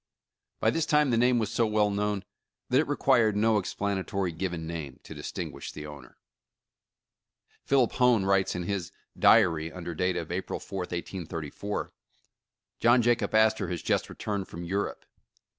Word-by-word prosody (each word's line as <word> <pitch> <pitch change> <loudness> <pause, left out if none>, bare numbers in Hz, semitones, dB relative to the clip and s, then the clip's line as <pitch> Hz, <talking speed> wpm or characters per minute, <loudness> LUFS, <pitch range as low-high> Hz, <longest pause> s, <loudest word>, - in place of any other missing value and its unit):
By - - +3
this 165 -1 -1
time 150 -3 +3
the - - +3
name 125 +1 +4
was 110 -2 -1
so 115 0 +2
well 105 -1 +2
known 100 -1 -1 0.5
that 130 +1 +4
it 155 - +1
required 125 -7 +3
no 110 +1 +3
ex 95 - -5
planatory 95 -3 -2
given 85 -2 -3
name 80 -5 -6
to - - -9
distinguish - - -6
the 75 - -8
owner. 75 -4 -11 1.5
Philip 135 -4 +3
Hone 125 -6 +3
writes 95 -1 +2
in 90 - -2
his 90 -2 -3 0.2
"Diary," 85 -7 +4
under 85 -1 -6
date 90 +2 0
of 85 0 -4
April 95 +2 -3
4th, 95 -3 -5
1834: 85 +1 -5 0.9
"John 120 +1 +5
Jacob 120 -2 +1
Astor 110 -3 +3
has 90 -2 -4
just - - 0
returned 100 -2 -4
from 85 - -8
Europe. 100 +4 -3
100 Hz, 160 wpm, -28 LUFS, 85-115 Hz, 1.5 s, John